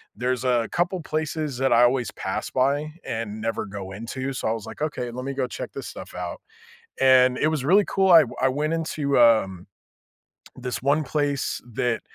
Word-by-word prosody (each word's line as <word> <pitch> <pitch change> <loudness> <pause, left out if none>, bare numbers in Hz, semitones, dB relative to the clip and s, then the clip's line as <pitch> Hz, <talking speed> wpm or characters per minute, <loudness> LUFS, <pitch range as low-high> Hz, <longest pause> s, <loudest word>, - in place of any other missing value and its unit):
there's 125 +3 -1
a 120 -3 +1
couple 175 +1 0
places 155 -3 -3
that 135 -1 +2
I 120 +1 +6
always 125 -1 +2
pass - - -4
by, 145 +4 0
and 110 -4 -4
never 115 +1 -2
go 95 -1 -7
into, 115 +6 -5
so, 130 - -3
I - - +1
was 115 -2 -6
like, - - -10
"Okay, 125 -6 -2
let 125 +2 -6
me 140 - -3
go 130 -2 -1
check - - -6
this - - -6
stuff - - -9
out," - - -5 0.6
and, 130 -1 +5
it - - +2
was 150 -4 -2
really 195 +5 +5
cool, 190 -1 +2
I 165 -2 +9 0.2
I 130 - +4
went 150 +4 -1
into, 155 -4 0
um, 100 -6 +3 0.9
this 125 -1 -5
one 145 +3 +2
place 145 0 -1
that 115 0 0
130 Hz, 195 wpm, -24 LUFS, 120-150 Hz, 0.9 s, I